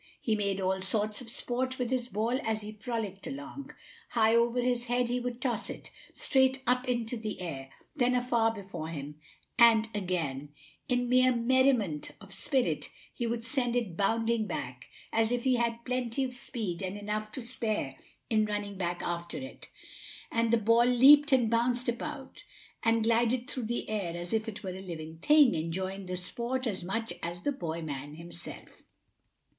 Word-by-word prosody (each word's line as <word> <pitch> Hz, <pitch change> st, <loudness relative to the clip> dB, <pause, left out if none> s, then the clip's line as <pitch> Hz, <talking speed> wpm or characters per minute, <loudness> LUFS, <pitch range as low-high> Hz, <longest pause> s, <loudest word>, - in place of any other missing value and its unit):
He 225 Hz, -, 0 dB
made 200 Hz, -2 st, 0 dB
all 190 Hz, 0 st, 0 dB
sorts 210 Hz, +3 st, 0 dB
of 240 Hz, -, -8 dB
sport 255 Hz, +2 st, -1 dB
with 250 Hz, -1 st, -2 dB
his 250 Hz, -2 st, 0 dB
ball 230 Hz, +4 st, 0 dB
as 220 Hz, -1 st, -1 dB
he 210 Hz, 0 st, -6 dB
frolicked 215 Hz, -3 st, -4 dB
along 285 Hz, +1 st, -7 dB, 0.4 s
high 225 Hz, -1 st, +3 dB
over 235 Hz, +1 st, +3 dB
his 245 Hz, -1 st, +1 dB
head 245 Hz, 0 st, +1 dB
he 245 Hz, +1 st, 0 dB
would 245 Hz, -1 st, -4 dB
toss 240 Hz, -4 st, -1 dB
it; -, -, -8 dB, 0.2 s
straight 265 Hz, -1 st, +2 dB
up 250 Hz, +1 st, +2 dB
into 240 Hz, -1 st, -1 dB
the 220 Hz, -2 st, -5 dB
air; 135 Hz, -7 st, -5 dB, 0.3 s
then 250 Hz, -3 st, +3 dB
far 235 Hz, -2 st, +2 dB
before 190 Hz, -7 st, -6 dB
him; 150 Hz, -2 st, -6 dB, 0.4 s
and 225 Hz, -2 st, +7 dB
again, 165 Hz, -8 st, -2 dB, 0.4 s
in 245 Hz, -1 st, +1 dB
mere 255 Hz, +1 st, +5 dB
merriment 240 Hz, -, +2 dB
of 195 Hz, -2 st, -12 dB
spirit, 260 Hz, -3 st, 0 dB, 0.2 s
he 240 Hz, -, -2 dB
would 230 Hz, 0 st, -2 dB
send 245 Hz, 0 st, +1 dB
it 225 Hz, -8 st, -1 dB
bounding 225 Hz, +3 st, +1 dB
back, 125 Hz, -8 st, -5 dB, 0.3 s
as 225 Hz, 0 st, +2 dB
if 245 Hz, -1 st, 0 dB
he 255 Hz, -2 st, +3 dB
had 235 Hz, 0 st, -1 dB
plenty 250 Hz, 0 st, -1 dB
of 255 Hz, -1 st, -3 dB
speed 215 Hz, -7 st, -3 dB
and 190 Hz, +1 st, -3 dB
enough 210 Hz, +1 st, -3 dB
to -, -, -4 dB
spare 215 Hz, -, -2 dB, 0.3 s
in 215 Hz, -1 st, +3 dB
running 205 Hz, -2 st, -3 dB
back 175 Hz, -1 st, -2 dB
after 170 Hz, 0 st, -3 dB
it. 265 Hz, -, -8 dB, 0.6 s
And 230 Hz, 0 st, +2 dB
the 235 Hz, -, +5 dB
ball 230 Hz, +2 st, +4 dB
leaped 285 Hz, +4 st, +7 dB
and 255 Hz, -4 st, +5 dB
bounced 240 Hz, +2 st, +1 dB
about 270 Hz, +3 st, -4 dB, 0.4 s
and 225 Hz, 0 st, +3 dB
glided 235 Hz, +2 st, +2 dB
through 260 Hz, -5 st, -4 dB
the 240 Hz, +1 st, -2 dB
air 195 Hz, -6 st, -2 dB
as 175 Hz, +2 st, -5 dB
if 220 Hz, 0 st, 0 dB
it 210 Hz, 0 st, -8 dB
were 190 Hz, -, -3 dB
a 190 Hz, -, -7 dB
live 160 Hz, -3 st, -7 dB
thing, 295 Hz, -4 st, +6 dB
enjoying 185 Hz, +4 st, -3 dB
the 180 Hz, 0 st, -3 dB
sport 240 Hz, +7 st, -2 dB
as 195 Hz, -6 st, -2 dB
much 225 Hz, +5 st, -2 dB
as 175 Hz, +1 st, -5 dB
the 290 Hz, -, +1 dB
boy 170 Hz, -, -4 dB
man 145 Hz, -1 st, -5 dB
himself. 170 Hz, +1 st, -10 dB
225 Hz, 180 wpm, -30 LUFS, 190-245 Hz, 0.6 s, and